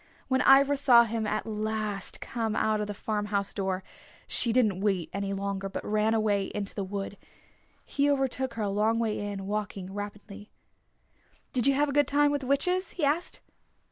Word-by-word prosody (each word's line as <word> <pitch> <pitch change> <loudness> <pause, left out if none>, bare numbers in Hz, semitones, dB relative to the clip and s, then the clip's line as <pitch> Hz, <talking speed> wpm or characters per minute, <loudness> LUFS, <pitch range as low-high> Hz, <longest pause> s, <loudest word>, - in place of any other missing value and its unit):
When 260 -1 +2
Ivra 275 +2 +6
saw 250 -4 +6
him 225 -1 -2
at 215 0 -2
last 215 -2 -3
come 225 -2 -2
out 215 -1 +1
of 210 - -2
the 205 - -4
farm 210 0 -2
house 200 -1 -1
door, 190 -1 -2 0.4
she 235 - +3
didn't 220 -6 +2
wait 190 -5 -1
longer, 195 0 -3
but - - -6
ran 215 +1 +1
away 205 -3 +1
into 200 -1 -3
the 200 - -3
wood. 200 +1 -5 0.7
He 285 0 +1
overtook 265 -3 -1
her 225 - -2
a 205 - 0
long 215 +3 +1
way 225 -2 -1
in, 205 -1 -4
walking 200 -2 -4
rapidly. 205 0 -8 1.0
"Did 250 0 +2
you 275 - +4
have 295 +2 +2
a 280 - -3
good 290 0 +3
time 290 0 +3
with 290 -1 -1
the 260 - -6
witches?" 360 +7 +1
he 325 - 0
asked. 310 +5 -1
215 Hz, 185 wpm, -28 LUFS, 200-260 Hz, 1.0 s, Ivra